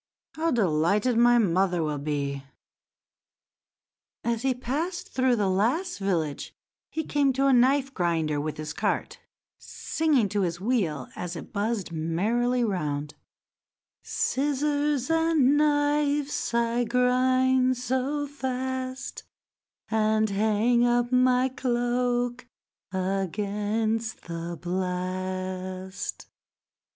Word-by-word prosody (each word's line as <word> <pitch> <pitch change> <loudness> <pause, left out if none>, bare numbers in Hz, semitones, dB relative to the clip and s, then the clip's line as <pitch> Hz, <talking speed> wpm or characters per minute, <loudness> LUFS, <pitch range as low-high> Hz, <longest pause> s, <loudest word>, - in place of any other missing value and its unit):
How 325 +1 0
delighted 205 - +2
my 240 +1 +5
mother 180 -4 +2
will 150 -2 -2
be!" 140 -1 -3 1.8
As 230 -1 -1
he 265 -1 +1
passed 300 +9 -3
through 255 -1 +2
the 205 -3 +1
last 240 - 0
village 165 -7 -2 0.3
he 320 - -3
came 285 -2 +2
to 270 +2 +1
a 275 - +5
knife 265 +2 +3
grinder 160 - 0
with 155 0 -4
his 155 0 -5
cart, 200 +2 -2 0.4
singing 300 -9 0
to 205 0 0
his 175 -2 -1
wheel 185 - -1
as 180 0 -5
it 165 - -9
buzzed 205 -2 -1
merrily 215 +10 0
round— 150 -8 -2 0.9
"Scissors 290 0 0
and 325 -4 +3
knives 290 -1 +1
I 235 0 +1
grind 255 +1 +2
so 260 +4 -1
fast, 260 -1 -4 0.7
And 220 -1 +2
hang 220 +4 +2
up 240 0 +2
my 255 0 +4
cloak 245 -1 -1 0.4
against 205 +4 -1
the 170 0 -5
blast." 185 +1 -4
235 Hz, 100 wpm, -26 LUFS, 185-260 Hz, 1.8 s, my